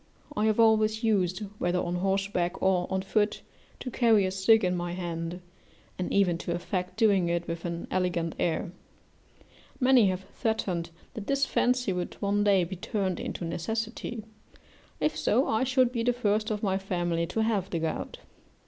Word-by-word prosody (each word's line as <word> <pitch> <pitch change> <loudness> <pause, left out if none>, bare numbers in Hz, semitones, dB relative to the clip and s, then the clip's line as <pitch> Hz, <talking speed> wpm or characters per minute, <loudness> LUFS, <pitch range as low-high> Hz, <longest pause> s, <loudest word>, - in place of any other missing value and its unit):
I 210 - +1
have 215 +1 +1
always 220 0 +4
used, 195 -4 +1 0.2
whether 175 +1 +1
on 175 0 -1
horseback 190 -1 0
or 185 -2 +2
on 190 0 0
foot, 210 +2 0 0.4
to 255 - -5
carry 225 -5 +4
a 185 - -1
stick 200 +3 +4
in 180 0 +1
my 175 0 -3
hand, 175 0 -4 0.6
and 180 - -2
even 180 -4 +2
to 170 - -2
affect 180 +1 -3
doing 200 -6 +3
it 170 0 -1
with 165 0 -4
an 170 -1 -3
elegant 175 -3 0
air; 170 0 0 1.1
many 255 -5 +5
have 185 0 -2
threatened 185 -7 -1 0.2
that 215 -4 -7
this 275 0 +2
fancy 250 -5 +1
would 180 -1 -4
one 205 0 +1
day 200 -3 +4
be 180 +2 -5
turned 190 -1 -2
into 175 - -4
necessity: 225 +6 -3 0.8
if 305 - +1
so, 250 +6 +2
I 220 +3 +1
should 255 -1 +3
be 235 -2 -2
the 245 +1 +2
first 215 -2 0
of 210 -1 -3
my 190 -2 +1
family 175 -3 -1
to 220 +5 0
have 205 -4 0
the 170 - -2
gout. 160 -1 -3
190 Hz, 175 wpm, -28 LUFS, 175-220 Hz, 1.1 s, many